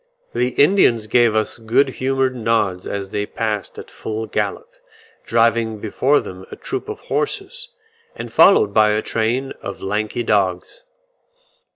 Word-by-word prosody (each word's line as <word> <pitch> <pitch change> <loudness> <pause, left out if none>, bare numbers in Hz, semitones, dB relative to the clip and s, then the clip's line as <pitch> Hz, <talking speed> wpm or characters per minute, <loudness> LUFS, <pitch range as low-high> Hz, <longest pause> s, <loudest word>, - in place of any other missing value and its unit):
The 125 - +1
Indians 140 - +4
gave 120 0 +3
us 110 +2 -1
good 115 +5 +2
humoured 130 0 -1
nods 110 -6 0
as 100 -1 -4
they 105 0 -2
passed 105 -3 -3
at - - -10
full 110 0 -5
gallop, 475 - -3 0.5
driving 115 -1 +2
before 130 +7 +1
them 95 0 -9
a - - -8
troop 390 +2 -5
of 430 - -6
horses, - - -3 0.5
and - - -8
followed 105 - +5
by 105 0 +4
a 110 - -1
train 120 +4 -1
of 100 - -7
lanky 105 +4 -2
dogs. 100 - -1
115 Hz, 145 wpm, -20 LUFS, 105-130 Hz, 0.5 s, followed